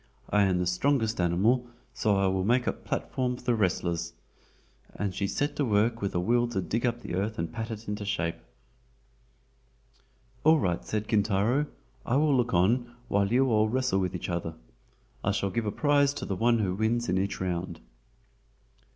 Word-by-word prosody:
"I 105 -1 +4
am 95 -2 +2
the 90 - 0
strongest 110 +3 +1
animal, 105 +9 +2 0.3
so 105 -3 +1
I 100 0 +2
will 95 0 +1
make 120 +5 +2
the - - +1
platform 125 -1 -3
for - - -14
the 120 -1 +2
wrestlers;" 85 -5 -1 0.8
and 100 -2 -2
she 100 +1 -1
set 145 +7 -1
to 145 - +1
work 115 0 +1
with 100 -2 -2
a - - +2
will 120 +6 +2
to 115 -5 -2
dig 110 +8 -1
up 120 0 -2
the 90 - -6
earth 100 +4 -1
and 85 - -1
to - - -17
pat 115 0 -4
it 110 0 -7
into 105 0 -3
shape. 85 -4 -2 2.1
"All 160 +1 +6
right," 90 - -1
said 105 0 -3
Kintaro, 110 +7 +2 0.4
"I 120 - 0
will 145 0 +3
look 125 -2 +1
on 120 +7 +2
while 100 0 +1
you 130 +1 +3
all 110 0 +3
wrestle 130 -4 +1
with 90 -1 -1
each 90 - -4
other. 85 -2 -3 0.7
I - - +1
shall 100 -1 -1
give 110 +3 -1
a - - 0
prize 145 +1 +2
to - - -4
the 95 - -2
one 115 +4 +3
who 100 -5 0
wins 115 +4 0
in 95 - +1
each 100 +1 -2
round." 90 -2 -3
105 Hz, 195 wpm, -28 LUFS, 95-120 Hz, 2.1 s, All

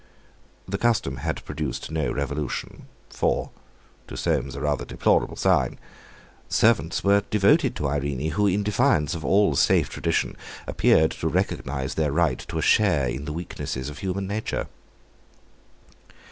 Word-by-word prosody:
The 100 +1 -3
custom 105 - +1
had 80 +3 -4
produced 75 -1 -4
no 80 -1 -1
revolution. 70 0 -4 0.2
For—to - - -4
Soames 70 -2 -1
a - - -5
rather 75 -1 -1
deplorable - - +1
sign—servants 110 -7 0
were 100 +1 +4
devoted 100 -1 +3
to 75 - -1
Irene, 70 +1 -2
who, 105 +5 +2
in 100 +2 +1
defiance 105 - +2
of 80 -2 -5
all 100 -6 +3
safe - - +3
tradition, - - -1 0.3
appeared 80 0 +3
to - - -3
recognise 65 -1 -1
their 75 -2 0
right 75 -4 +1
to - - -4
a - - -1
share 90 -11 +3
in 65 +4 -4
the 75 - -4
weaknesses 75 -5 -5
of 75 - -10
human 95 0 -2
nature. 105 +3 -3
80 Hz, 135 wpm, -25 LUFS, 70-100 Hz, 0.3 s, were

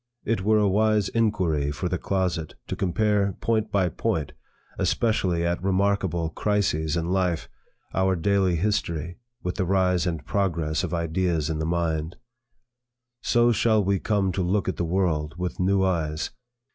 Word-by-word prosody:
It 115 -4 0
were 110 +3 +3
a 105 -1 +3
wise 105 0 +2
inquiry 90 -11 +1
for 70 - -3
the - - -2
closet, 90 -5 -1
to - - -4
compare, 100 +1 +1
point 110 -1 0
by 95 -3 +2
point, 80 -1 -2 0.5
especially 90 -7 +1
at 85 +1 -1
remarkable 95 -3 +1
crises 85 -6 0
in 85 +1 -1
life, 90 -3 0 0.5
our 95 0 +2
daily 95 +1 +2
history, 85 -2 -1 0.2
with 90 - -3
the 95 - +1
rise 90 -2 +2
and 80 -3 -3
progress 85 -6 0
of - - -3
ideas 85 -2 0
in 80 - -2
the 80 - -1
mind. 80 -1 -1 1.1
So 120 0 +3
shall 110 -1 +3
we 100 0 +1
come 100 -2 +1
to 95 - -2
look 95 +3 0
at 95 - -2
the 85 - -1
world 80 -4 0
with 90 0 -4
new 95 +1 +2
eyes. 80 -4 -1
90 Hz, 160 wpm, -25 LUFS, 85-100 Hz, 1.1 s, were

